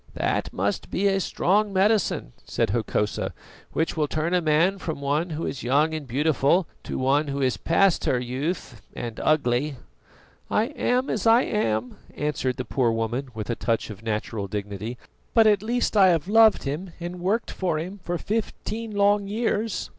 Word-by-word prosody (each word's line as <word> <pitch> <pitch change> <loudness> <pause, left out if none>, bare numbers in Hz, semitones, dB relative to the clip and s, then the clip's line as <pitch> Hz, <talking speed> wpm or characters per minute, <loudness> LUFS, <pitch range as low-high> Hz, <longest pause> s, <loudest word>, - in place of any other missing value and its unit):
"That - - -1
must 100 +2 -2
be 195 - -1
a 195 -1 +3
strong 200 +3 +1
medicine," 195 - +1
said - - -1
Hokosa, 110 -1 -1 0.4
"which 160 - 0
will 155 -2 +1
turn 155 +4 -1
a 180 - +3
man 165 +5 +2
from 160 -5 -4
one 145 +5 0
who 160 +1 -3
is 135 - -4
young 145 +6 +2
and 155 -3 -5
beautiful 145 +6 +2 0.2
to - - -4
one 140 +3 +2
who 140 0 -3
is 130 -2 +1
past 185 +2 +2
her 125 - +2
youth 130 +1 -4
and 115 -2 -5
ugly." 145 -1 +1 0.7
"I 225 +4 +1
am 255 -3 0
as 220 +1 -1
I 230 +3 +6
am," 115 - -1 0.2
answered 145 -4 -1
the 130 - -3
poor 120 +1 +1
woman, 115 +4 -2
with 110 +1 -3
a - - -1
touch 115 -1 -1
of 105 -1 -10
natural 110 -2 -3
dignity, 105 +3 -5 0.4
"but 225 -1 +7
at 205 -3 +4
least 235 +1 -1
I 195 -2 +7
have 170 -2 +2
loved 220 +1 +5
him 160 +6 -4
and 175 +1 -6
worked 205 +7 0
for 175 -4 -1
him 185 +6 -5
for 175 -1 -2
fifteen 220 +2 -3
long 200 0 +3
years." 220 0 -1
155 Hz, 175 wpm, -25 LUFS, 125-200 Hz, 0.7 s, but